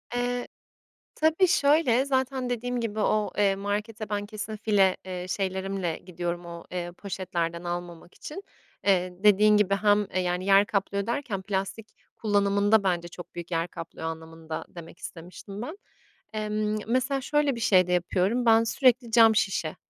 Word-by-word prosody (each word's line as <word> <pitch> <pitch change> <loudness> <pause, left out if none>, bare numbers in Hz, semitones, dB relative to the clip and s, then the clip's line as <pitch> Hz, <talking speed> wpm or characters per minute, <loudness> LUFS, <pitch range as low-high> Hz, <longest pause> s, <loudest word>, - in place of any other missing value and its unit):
Eee, 245 0 -1 0.7
tabii, 320 +4 +3
şöyle, 280 -5 +3
zaten 260 -2 -1
dediğim 245 +1 -2
gibi 220 -2 -3
o, 210 0 +1
eee, 200 -2 +3
markete 210 +2 -4
ben 205 0 -2
kesin 215 0 -6
file, 200 -3 +2
eee, 180 -1 -5
şeylerimle 190 -2 -2
gidiyorum 175 -1 -5
o, 170 0 -8
eee, 175 -1 -4
poşetlerden 175 -3 -3
almamak 175 0 -6
için. 380 +7 -8 0.4
Eee, 185 -2 +2
dediğin 210 +1 +6
gibi 200 -1 +3
hem, 205 0 +3
eee, 185 - +1
yani, 180 +1 -1
yer 195 +1 +6
kaplıyor 200 0 -1
derken 235 -6 -2
plastik 195 +2 -3 0.3
kullanımında 205 0 +2
bence 175 -2 0
çok 175 +1 -11
büyük 170 0 -7
yer 165 0 0
kaplıyor 165 -2 -8
anlamında 160 0 -6
demek 170 -1 -11
istemiştim 185 +4 -9
ben. 315 +10 -6 0.6
Emm, 215 0 -1
mesela, 255 +3 0
şöyle 295 0 +1
bir 235 - -6
şey 185 -5 +4
de 180 - -2
yapıyorum, 185 +7 +1
ben 225 0 +6
sürekli 250 0 +2
cam 225 -1 +6
şişe, 185 -7 0
205 Hz, 155 wpm, -27 LUFS, 180-225 Hz, 0.7 s, dediğin